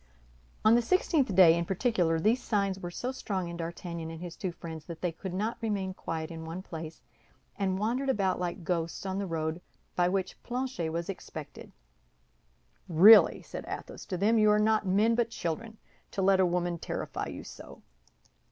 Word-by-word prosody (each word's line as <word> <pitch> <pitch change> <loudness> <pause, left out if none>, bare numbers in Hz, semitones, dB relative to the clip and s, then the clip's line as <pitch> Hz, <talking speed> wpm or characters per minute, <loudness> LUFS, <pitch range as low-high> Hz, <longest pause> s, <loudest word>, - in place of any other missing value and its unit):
On 215 - +7
the 240 - +5
sixteenth 280 - +1
day, 170 -3 +8
in 170 - 0
particular, 180 -4 +1
these 225 +9 +2
signs 200 -4 0
were 175 - -5
so 245 +8 -4
strong 195 -8 -3
in 170 - -6
D'Artagnan 170 0 -5
and 165 0 -7
his 175 -1 -7
two 185 - -3
friends 160 -2 -8
that 170 -1 -8
they 180 - -1
could 180 +3 -7
not 210 +5 -2
remain 200 -4 -1
quiet 160 -3 -5
in 165 -1 -7
one 165 +3 -6
place, 160 -3 -8 0.5
and 190 -2 0
wandered 240 +7 -1
about 195 -8 +1
like 175 -1 -3
ghosts 165 +2 -2
on 190 0 -2
the 200 - -2
road 160 0 -2 0.3
by 175 0 +3
which 190 0 -2
Planchet 250 -9 -3
was 170 +1 -3
expected. 195 - -8 1.2
"Really," 195 +7 +8
said - - -7
Athos - - -7
to 185 - -3
them, 220 +5 +3
"you 215 0 +5
are 210 - +5
not 215 -1 +2
men 210 +5 +3
but 235 0 +1
children, 220 +3 -4 0.3
to 195 - -2
let 190 0 +4
a 185 - +5
woman 175 -1 -1
terrify - - -4
you - - -7
so! - - -12
185 Hz, 185 wpm, -29 LUFS, 170-215 Hz, 1.2 s, day